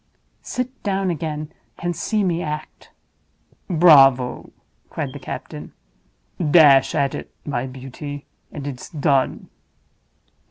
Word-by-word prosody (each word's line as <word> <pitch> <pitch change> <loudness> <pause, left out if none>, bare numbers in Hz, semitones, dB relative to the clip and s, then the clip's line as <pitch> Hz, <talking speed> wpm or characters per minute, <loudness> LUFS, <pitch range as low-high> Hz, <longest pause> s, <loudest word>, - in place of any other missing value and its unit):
Sit 255 +1 -5
down 195 -2 0
again 155 -2 -4 0.2
and 175 0 -3
see 215 +3 0
me 175 -2 0
act." 150 -1 -6 0.8
"Bravo!" 135 -7 +5 0.4
cried - - -4
the - - -8
captain. - - -8 0.7
"Dash 150 -4 +5
at 140 -1 +1
it, - - -7
my 130 -3 -2
beauty—and 140 +2 -9
it's 135 -3 -6
done!" 140 -4 0
150 Hz, 105 wpm, -21 LUFS, 135-175 Hz, 0.8 s, Bravo